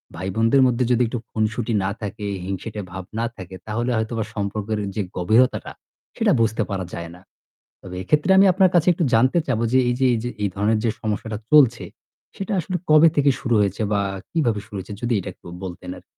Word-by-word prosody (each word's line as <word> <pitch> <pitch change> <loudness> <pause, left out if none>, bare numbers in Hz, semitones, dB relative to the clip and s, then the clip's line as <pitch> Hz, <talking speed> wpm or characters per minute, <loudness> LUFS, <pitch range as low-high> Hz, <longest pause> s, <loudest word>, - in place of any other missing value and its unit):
ভাইবোনদের 115 +8 +2
মধ্যে 125 0 +1
যদি 125 0 +3
একটু 120 +1 -4
খুনসুটি 110 +1 -1
না 95 - 0
থাকে, 105 0 -5 0.2
হিংসেটে 105 +3 -5
ভাব 95 +1 -6 0.2
না 115 - +1
থাকে 95 -1 -9
তাহলে 115 +3 -2
হয়তো 110 +1 -2
বা 110 - -1
সম্পর্কের 105 +1 -2 0.2
যে 105 - 0 0.2
গভীরতাটা, 110 +8 +2 0.5
সেটা 225 -3 +3
বুঝতে 110 0 +1
পারা 95 -2 -2
যায় 85 0 -6
না। 90 - -16 0.6
তবে 90 -1 -8
এক্ষেত্রে 150 - +1
আমি 195 - +7
আপনার 185 0 +4
কাছে 175 0 +4
একটু 175 0 -1
জানতে 130 +8 +4
চাবো 120 -4 0
যে 130 - +5
এই 125 - +1
যে, - - +3
এই - - 0
যে 120 - -2
এই 100 - +2
ধরনের 105 +2 +1
যে 115 - +2
সমস্যাটা 110 0 -3
চলছে 120 -9 +5 0.5
সেটা 195 +2 -4
আসলে 180 +2 -3
কবে 155 +2 +8
থেকে 145 -1 +4
শুরু 120 -2 0
হয়েছে 100 +1 0
বা 100 - +2 0.3
কিভাবে 120 -11 0
শুরু 105 -2 -9
হয়েছে, 95 +2 -7
যদি 120 0 0
এটা 100 - -5
একটু - - -21 0.2
বলতেন 90 0 -7
আরকি? 90 - -17
110 Hz, 205 wpm, -22 LUFS, 100-130 Hz, 0.6 s, কবে